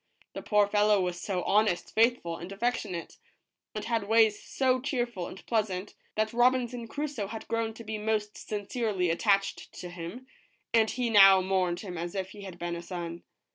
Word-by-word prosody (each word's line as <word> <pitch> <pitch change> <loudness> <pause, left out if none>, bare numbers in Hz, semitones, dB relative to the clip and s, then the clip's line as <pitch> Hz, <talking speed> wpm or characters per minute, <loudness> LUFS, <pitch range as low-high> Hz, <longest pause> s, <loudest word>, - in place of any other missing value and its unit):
The - - -5
poor 210 -1 +3
fellow 210 0 +3
was 180 -1 -2
so 185 -3 -2
honest, 210 -3 +1
faithful, 225 -7 +2
and 175 +3 -8
affectionate, 200 -5 -3 0.6
and 210 0 -4
had 225 -3 -1
ways 220 -1 +4
so 255 -1 +1
cheerful 240 -9 -2
and 190 - -11
pleasant, 205 -4 -1 0.2
that 215 +1 0
Robinson 245 -1 +2
Crusoe 285 -5 -3
had 220 +2 -7
grown 225 -1 -1
to 230 - -9
be 215 0 -4
most 210 -1 -1
sincerely 205 -3 -2
attached 195 +3 +1
to 180 - -8
him, 175 +9 -7 0.5
and 220 -1 +4
he 245 -2 -1
now 195 -2 +9
mourned 185 -2 0
him 180 -5 -6
as 175 +3 -4
if 190 -1 -3
he 205 - -11
had 190 -3 -8
been 175 0 -3
a 170 - -5
son. 170 -1 -6
210 Hz, 175 wpm, -29 LUFS, 185-230 Hz, 0.6 s, now